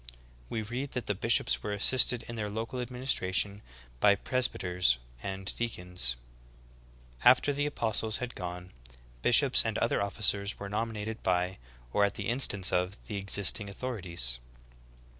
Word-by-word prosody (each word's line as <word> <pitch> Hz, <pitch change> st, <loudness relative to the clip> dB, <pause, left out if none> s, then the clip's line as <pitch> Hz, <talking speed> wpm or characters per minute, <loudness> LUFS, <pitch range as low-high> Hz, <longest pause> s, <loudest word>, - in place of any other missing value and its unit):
We 110 Hz, -, -3 dB
read 125 Hz, +6 st, -5 dB
that 125 Hz, -, -3 dB
the 105 Hz, -, 0 dB
bishops 115 Hz, +4 st, +1 dB
were 105 Hz, -, -3 dB
assisted 120 Hz, +3 st, +3 dB
in 115 Hz, -, -7 dB
their 105 Hz, -2 st, -3 dB
local 115 Hz, +4 st, -4 dB
adminis 125 Hz, +2 st, -1 dB
tration 100 Hz, +2 st, -1 dB, 0.4 s
by 100 Hz, +7 st, +5 dB
presbyters 90 Hz, -, +1 dB, 0.2 s
and 95 Hz, -1 st, -3 dB
deacons. 90 Hz, -, 0 dB, 1.1 s
4. -, -, +8 dB
After 145 Hz, -, +1 dB
the 145 Hz, +1 st, 0 dB
apostles 110 Hz, -5 st, +1 dB
had 125 Hz, -1 st, -5 dB
gone, 90 Hz, 0 st, -7 dB, 0.5 s
bishops -, -, +6 dB
and -, -, -2 dB
other -, -, +1 dB
offi 100 Hz, +2 st, -3 dB
cers 100 Hz, 0 st, +1 dB
were 100 Hz, -, -7 dB
nominated 110 Hz, +1 st, -3 dB
by, 90 Hz, 0 st, 0 dB, 0.3 s
or 105 Hz, -, +3 dB
at 100 Hz, 0 st, +1 dB
the 100 Hz, 0 st, -3 dB
instance 110 Hz, -6 st, +3 dB
of, 90 Hz, +2 st, 0 dB
the 105 Hz, -3 st, -4 dB
existing 100 Hz, +1 st, +1 dB
authorities. 90 Hz, -, -2 dB
105 Hz, 150 wpm, -30 LUFS, 95-115 Hz, 1.1 s, 4